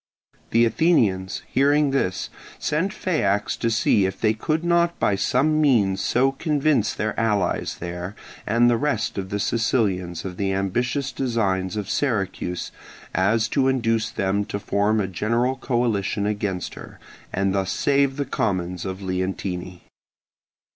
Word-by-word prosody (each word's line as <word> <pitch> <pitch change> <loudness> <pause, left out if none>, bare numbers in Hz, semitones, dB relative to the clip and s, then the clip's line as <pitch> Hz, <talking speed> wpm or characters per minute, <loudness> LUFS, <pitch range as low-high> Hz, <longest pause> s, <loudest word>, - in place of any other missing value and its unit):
The 115 +1 +4
Athenians 110 - +1
hearing 145 +1 +3
this, 95 -9 -1 0.3
sent 165 +6 -1
Phaeax 105 - 0
to 115 - +1
see 105 -3 +3
if 95 0 -6
they 110 -1 +3
could 155 +9 -1
not 170 0 +2
by - - +2
some 155 +9 +2
means 105 -10 +3
so 135 +2 +2
convince 140 -5 +1
their 110 +1 -2
allies 105 -4 0
there 90 +3 -5 0.3
and 115 +3 +4
the 120 -1 +3
rest 145 -6 -1
of 95 -1 -5
the 100 - -2
Sicilians 100 -7 0
of 90 -2 -6
the 95 -1 0
ambitious 125 +8 -1
designs 110 -7 -1
of 105 -2 -3
Syracuse 100 -8 -2 0.4
as 110 +5 +2
to 135 +1 +2
induce 115 -3 +1
them 100 -2 0
to 100 - -4
form 100 +1 +1
a 100 - +1
general 115 +7 0
coalition 115 -6 0
against 100 -3 -2
her, - - -11 0.3
and 95 0 0
thus 95 -2 0
save 140 +2 +2
the 140 - -1
commons 90 -6 -2
of 95 +1 -5
Leontini. 90 -1 -3
110 Hz, 145 wpm, -23 LUFS, 95-130 Hz, 0.4 s, The